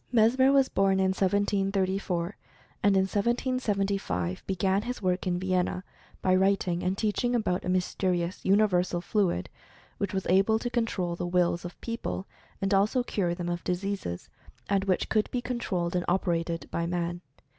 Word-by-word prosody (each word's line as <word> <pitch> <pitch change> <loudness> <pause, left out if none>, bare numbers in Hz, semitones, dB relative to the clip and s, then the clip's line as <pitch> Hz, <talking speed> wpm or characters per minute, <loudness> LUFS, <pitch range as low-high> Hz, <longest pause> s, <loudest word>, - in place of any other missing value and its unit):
Mesmer 250 +3 +5
was 275 -1 +4
born 195 0 +2
in 190 0 +3
1734, 195 -1 0 0.5
and 200 0 +4
in 190 - +4
1775 200 - -1
began 190 +1 +1
his 250 +3 -4
work 185 -1 -1
in 175 -1 +1
Vienna 185 0 0 0.4
by 185 - +3
writing 185 -2 +2
and 185 +1 -1
teaching 235 +3 0
about 180 -6 0
a 180 - -3
mys 180 0 0
terious 180 -2 0
"universal 185 -3 +3
fluid" 175 - 0 0.5
which 200 - -1
was 190 -1 -2
able 195 +5 +4
to 240 +2 -4
control 215 -8 -1
the 175 - -3
wills 175 -1 +1
of 175 - -8
people, 230 -4 -4 0.4
and 195 +1 +1
also 210 +6 +3
cure 180 -7 -1
them 175 -1 -4
of 175 0 -3
diseases, 180 - -3 0.4
and 200 -1 +1
which 185 -2 +1
could 215 -1 +1
be 250 - -1
controlled 195 -9 -2
and 180 - +1
operated 170 -2 0
by 170 0 -1
man. 175 0 -2
190 Hz, 160 wpm, -28 LUFS, 180-205 Hz, 0.5 s, Mesmer